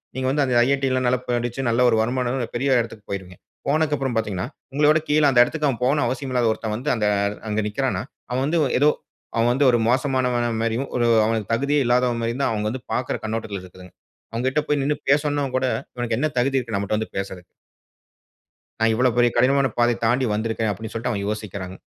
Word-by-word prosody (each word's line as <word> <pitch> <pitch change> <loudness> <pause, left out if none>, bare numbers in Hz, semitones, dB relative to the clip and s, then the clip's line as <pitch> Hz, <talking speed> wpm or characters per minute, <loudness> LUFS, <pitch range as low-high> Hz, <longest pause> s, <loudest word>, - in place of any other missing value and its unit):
நீங்க 130 0 -1
வந்து 145 +2 +2
அந்த 130 -2 0
"IIT" 140 0 +1
லாம் 130 0 0
நல்லா 125 0 +2
படிச்சு 120 +2 -2
நல்ல 115 +2 +2
ஒரு 115 - +3
வருமானம் 125 +1 -1
பெரிய 130 +1 +2
இடத்துக்கு 115 -2 -8
போயிருவீங்க. 90 -2 -6 0.3
போனதுக்கு 150 +1 +2
அப்புறம் 135 -3 -2
பார்த்தீங்கன்னா, 105 -1 -2 0.3
உங்கள 145 +1 +2
விட 155 0 +3
கீழ 150 0 +3
அந்த 120 -2 +6
இடத்துக்கு 145 -6 -2
போகணும் 145 0 +2
அவசியம் 130 +2 -3
இல்லாத 120 -2 +2
ஒருத்தன் 110 -1 -4
வந்து 130 +7 -2
அந்த 105 -3 0 0.4
அங்க 105 +1 0
நிக்குறான, 105 -3 -1 0.3
அவன் 130 +1 0
வந்து 165 +1 +1 0.2
ஏதோ 145 +2 +5 0.5
அவன் 115 +1 +3
வந்து 140 +3 +2
ஒரு 120 - +3
மோசமானவன் 125 -3 +1
மாரியும் 115 +4 -1
ஒரு 120 -1 +2 0.2
அவனுக்கு 110 -1 -1
தகுதியே 140 +5 +1
இல்லாதவன் 120 -1 +2
மாரியும் 115 +3 -2
தான் - - +1
அவங்க 105 -1 -1
வந்து 125 +3 -5
பார்க்குற 125 0 -1
கண்ணோட்டத்தில 110 -3 -4
இருக்கு. 90 0 -14 0.4
அவங்கிட்ட 130 +6 0
போய் 145 -1 +1
நிண்ணு 150 +2 +1
பேசனுன 145 -1 +2
கூட 130 - 0 0.3
இவனுக்கு 120 -2 -2
என்ன 155 +3 +1
தகுதி 135 +2 +2
இருக்கு 115 -4 -4
நம்மட்ட 100 +2 -1
வந்து 110 - -5
பேசுறதுக்கு. 95 -2 -5 1.3
நான் 115 0 +3
இவ்வளோ 125 +2 +2
பெரிய 120 0 +5
கடினமான 135 +2 +4
பாதை 120 0 +3
தாண்டி 125 +3 +2
வந்துருக்குறேன், 110 0 -1
அப்படி 110 +3 -7
சொல்லிட்டு 120 +2 -2
அவங்க 100 -1 -3
யோசிக்கிறாங். 100 -3 -5
120 Hz, 195 wpm, -23 LUFS, 110-135 Hz, 1.3 s, அந்த